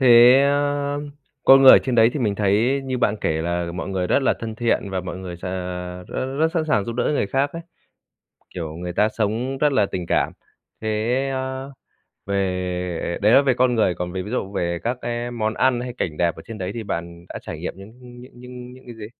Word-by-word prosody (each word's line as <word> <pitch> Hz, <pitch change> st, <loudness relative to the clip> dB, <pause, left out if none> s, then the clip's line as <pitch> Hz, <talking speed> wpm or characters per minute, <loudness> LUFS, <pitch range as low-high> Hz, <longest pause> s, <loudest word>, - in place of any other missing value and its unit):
Thế 125 Hz, 0 st, +8 dB
á 145 Hz, 0 st, +1 dB, 0.5 s
con 135 Hz, 0 st, +8 dB
người 135 Hz, -, +10 dB
ở -, -, +9 dB
trên 130 Hz, -1 st, -2 dB
đấy 115 Hz, 0 st, +5 dB
thì 150 Hz, -, -3 dB
mình 105 Hz, -4 st, +1 dB
thấy 110 Hz, +7 st, +2 dB
như 130 Hz, -1 st, -2 dB
bạn 110 Hz, -3 st, +1 dB
kể 80 Hz, 0 st, 0 dB
là 85 Hz, 0 st, -2 dB
mọi 90 Hz, -, -4 dB
người 95 Hz, -2 st, -1 dB
rất 140 Hz, -, +2 dB
là -, -, +3 dB
thân 110 Hz, -1 st, -5 dB
thiện, 110 Hz, -3 st, 0 dB
và 95 Hz, -1 st, -2 dB
mọi 90 Hz, -1 st, -6 dB
người 90 Hz, -2 st, -7 dB
s 85 Hz, -, -12 dB
à, 90 Hz, -1 st, -5 dB
rất 130 Hz, +1 st, -4 dB
rất 160 Hz, +1 st, +3 dB
sẵn 165 Hz, -2 st, +1 dB
sàng 125 Hz, -10 st, +1 dB
giúp 115 Hz, -, -4 dB
đỡ 120 Hz, +1 st, -1 dB
người 145 Hz, -8 st, +1 dB
khác 135 Hz, +7 st, 0 dB
ấy, 165 Hz, -, -6 dB, 0.9 s
kiểu, 80 Hz, -3 st, -5 dB
người 90 Hz, +1 st, -5 dB
ta 105 Hz, +4 st, +2 dB
sống 115 Hz, +5 st, -2 dB
rất 150 Hz, +1 st, +2 dB
là 105 Hz, -6 st, +3 dB
tình 90 Hz, -3 st, -5 dB
cảm. -, -, +1 dB, 0.5 s
Thế 110 Hz, -, -3 dB, 0.4 s
á 130 Hz, 0 st, -3 dB, 0.6 s
về 90 Hz, -3 st, -2 dB
đấy 105 Hz, +2 st, +5 dB
là 135 Hz, -, +7 dB
về 135 Hz, -2 st, +2 dB
con 125 Hz, 0 st, +2 dB
người, 110 Hz, -6 st, +2 dB
còn 90 Hz, 0 st, -4 dB
về 95 Hz, 0 st, -3 dB
ví 105 Hz, -, -8 dB
dụ 100 Hz, -5 st, -3 dB
về 85 Hz, -3 st, -1 dB
các 120 Hz, +2 st, -2 dB
cái 120 Hz, 0 st, -3 dB
món 110 Hz, -2 st, -2 dB
ăn 130 Hz, -2 st, +2 dB
hay 125 Hz, 0 st, -5 dB
cảnh 75 Hz, -3 st, -2 dB
đẹp 85 Hz, 0 st, +1 dB
ở 80 Hz, -, -10 dB
trên 115 Hz, -2 st, -8 dB
đấy 90 Hz, 0 st, -3 dB
thì 115 Hz, -, -4 dB
bạn 85 Hz, -3 st, -6 dB
đã -, -, -6 dB
trải -, -, -7 dB
nghiệm -, -, -5 dB
những 105 Hz, +5 st, -13 dB
những 120 Hz, -1 st, -13 dB
những 125 Hz, -1 st, -15 dB
những 125 Hz, 0 st, -10 dB
những 130 Hz, 0 st, -17 dB
cái 120 Hz, -, -9 dB
gì? 110 Hz, -2 st, -8 dB
110 Hz, 240 wpm, -22 LUFS, 90-130 Hz, 0.9 s, người